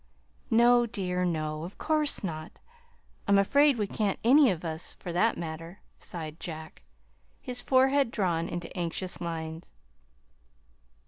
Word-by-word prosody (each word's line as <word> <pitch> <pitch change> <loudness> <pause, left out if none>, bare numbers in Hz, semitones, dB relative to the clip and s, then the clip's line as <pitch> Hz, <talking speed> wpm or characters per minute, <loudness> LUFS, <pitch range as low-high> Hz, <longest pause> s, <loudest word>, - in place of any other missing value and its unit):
"No, 240 +1 +5
dear, 180 -4 -2
no; 155 -3 -2
of 175 +4 -8
course 305 -5 +1
not! 155 -3 -5 0.7
I'm 200 0 +5
afraid 280 +7 +4
we 210 - 0
can't 200 0 -1
any 270 +3 +6
of 175 -3 -2
us, 160 0 -3
for 175 - -7
that 220 +6 +2
matter," 165 +2 -7 0.2
sighed 160 -1 -7
Jack, 160 -2 -8 0.6
his 250 -2 -2
forehead 265 0 +3
drawn 175 -7 -1
into 175 -1 -6
anxious 180 +1 -3
lines. 160 - -5
180 Hz, 130 wpm, -28 LUFS, 165-235 Hz, 0.7 s, any